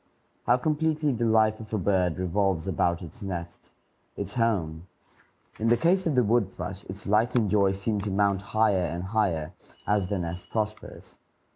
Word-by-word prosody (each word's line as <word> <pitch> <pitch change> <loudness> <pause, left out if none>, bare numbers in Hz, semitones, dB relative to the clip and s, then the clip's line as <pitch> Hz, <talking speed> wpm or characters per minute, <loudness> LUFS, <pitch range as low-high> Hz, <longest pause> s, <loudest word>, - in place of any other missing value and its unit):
How 120 - +5
completely 155 +1 0
the 120 -2 0
life 110 -1 +3
of 110 -1 -10
a - - +1
bird 90 -4 +1
revolves 95 -1 0
about 85 0 0
its 85 +8 -11
nest, 85 -3 -6 0.5
its 100 0 -4
home! 90 -8 -1 0.7
In 110 - 0
the 120 +1 +4
case 180 +7 +2
of 155 - 0
the 125 - +4
wood 110 -3 +2
thrush, 90 +2 -6
its 95 +2 -7
life 110 +5 +2
and 110 -5 +2
joy 100 -2 +3
seem 100 +2 -2
to 100 +1 -3
mount 100 0 +1
higher 100 -1 +2
and 85 +1 -4
higher 95 -6 -1 0.3
as 100 -3 +1
the 100 - -1
nest 85 0 -5
prospers. 110 -1 -5
100 Hz, 175 wpm, -27 LUFS, 90-115 Hz, 0.7 s, How